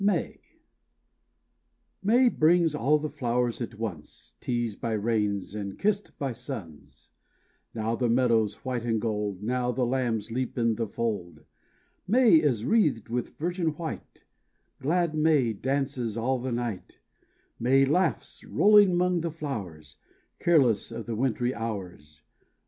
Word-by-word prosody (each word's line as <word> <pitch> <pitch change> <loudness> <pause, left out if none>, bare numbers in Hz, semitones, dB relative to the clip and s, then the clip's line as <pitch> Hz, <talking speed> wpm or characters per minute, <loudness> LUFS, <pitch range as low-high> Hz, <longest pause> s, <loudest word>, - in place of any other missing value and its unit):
May 240 +6 +5
brings 165 -3 +3
all 150 +1 +2
the 150 +1 -3
flowers 120 -1 -1
at 115 -2 -5
once, 95 -9 -7
Teased 120 -4 -3
by 115 -2 -1
rains 105 -3 -1
and 100 -2 -5
kissed 205 0 -1
by 135 -3 -2
suns; 85 - -10 0.6
Now 115 +1 -1
the 120 0 0
meadows 115 -3 +2
white 125 -3 -2
and 115 -2 0
gold; 105 -3 -3
Now 125 +2 0
the 125 +1 0
lambs 120 -4 -1
leap 130 +2 -3
in 115 -1 +2
the 115 0 -2
fold. 105 -6 -4 0.6
May 230 -3 +6
is 130 -8 +1
wreathed 145 - +2
with 120 0 -3
virgin 170 -2 -1
white; 165 -2 -7 0.5
Glad 165 +4 +1
May 150 -7 +2
dances 130 -1 -2
all 130 +3 0
the 130 +1 -4
night; 120 -5 -4 0.6
May 135 +3 +4
laughs, 170 +5 0
rolling 205 -3 +5
'mong 180 -1 +1
the 170 - -2
flowers, 95 - -7 0.4
Careless 130 -12 +3
of 115 -1 -6
the 115 - -4
wintry 125 +1 0
hours. 90 - -7
120 Hz, 130 wpm, -27 LUFS, 110-150 Hz, 0.6 s, May